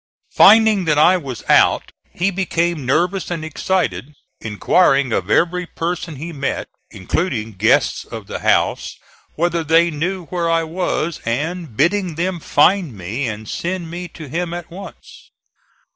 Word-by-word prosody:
Finding 215 -2 +6
that 150 -2 +2
I 175 +5 +6
was 135 -9 -7
out - - +3 0.2
he 185 +3 0
became 170 -6 -1
nervous 180 +6 0
and 165 -3 -4
excited, 160 -2 -2 0.2
inquiring 135 - +2
of 90 +1 -1
every 180 +7 +1
person 170 -1 -4
he 165 +5 -7
met, 140 -2 -3 0.2
including 110 - -3
guests 105 +2 +1
of - - -9
the - - -6
house, - - +1 0.4
whether 170 0 0
they 165 +2 +3
knew 175 +4 -3
where 170 0 -2
I 165 0 +2
was, 170 -1 -2
and 150 +2 -3
bidding 175 +2 +1
them 175 +2 -2
find 160 - +2
me 110 +9 -3
and 110 -1 -6
send 175 - -4
me 175 +1 -6
to 160 -3 -11
him 170 +4 -3
at 175 -1 -8
once. 195 +3 -12
165 Hz, 145 wpm, -19 LUFS, 140-180 Hz, 0.4 s, Finding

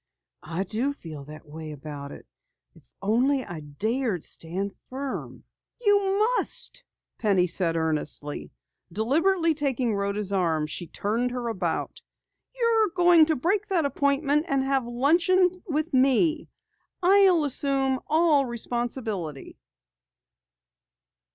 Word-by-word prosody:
"I 165 +4 -3
do 225 +8 -1
feel 155 - -9
that 150 +1 -11
way 155 +1 -8
about 145 -1 -8
it. - - -11 0.5
If - - -22
only 255 +6 +2
I 175 -2 -7
dared 200 - -2
stand 190 +5 -4 0.2
firm 270 +1 -5 0.2
" - - -62
"You 400 -1 +3
must," 485 +2 0 0.4
Penny 195 -5 +3
said 170 -1 0
earnestly. 150 -2 -3 0.4
Deliberately 325 - +2
taking 265 -6 0
Rhoda's 200 0 -1
arm 165 -5 +1
she 165 +3 -6
turned 225 +9 -1
her 245 -1 -3
about. 180 -7 -3 0.5
"You're 370 -9 +4
to 315 0 +1
break 385 +9 0
that 360 -7 +1
appointment 280 +2 +1
and 275 -2 +1
have 270 -2 0
luncheon 340 +9 +3 0.2
with 310 0 -1
me. 275 +5 +3 0.5
I'll 375 -3 +5
assume 270 -1 0
all 315 -2 +4
the 265 - -3
responsibility." 230 - -3
255 Hz, 120 wpm, -26 LUFS, -, 0.5 s, I'll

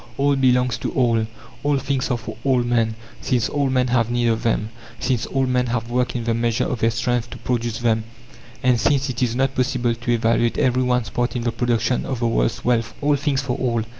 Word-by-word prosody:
All 140 0 +3
belongs 125 -2 +2
to - - -2
all. 115 -4 +2 0.3
All 145 -1 +1
things 135 -1 -1
are 125 - +1
for 115 - -8
all 130 -3 +2
men, 115 -2 +1 0.3
since 125 -4 +1
all 140 -2 0
men 130 -1 +1
have 120 -2 +2
need 120 -1 +1
of 115 0 0
them, 110 -2 0 0.3
since 125 -2 0
all 135 -1 0
men 125 -1 +1
have 115 0 -2
worked 125 0 0
in 120 - -2
the 115 0 0
measure 115 0 0
of 125 - -2
their 115 - +3
strength 120 +1 -1
to 120 - -8
produce 120 -1 -2
them, 110 -2 +1 0.6
and 125 -2 +3
since 135 +3 +2
it 120 - -5
is 120 -2 +1
not 135 +1 +1
possible 125 -2 0
to 120 +1 -3
evaluate 115 0 +2
every 130 -1 +2
one's 125 -2 0
part 120 +1 -1
in 120 - -2
the 120 - 0
production 120 0 0
of 130 - -2
the 120 - 0
world's - - 0
wealth. 115 -2 +1
All 145 0 +2
things 140 -1 0
for 125 -3 -2
all. 115 -3 0
120 Hz, 225 wpm, -22 LUFS, 115-130 Hz, 0.6 s, All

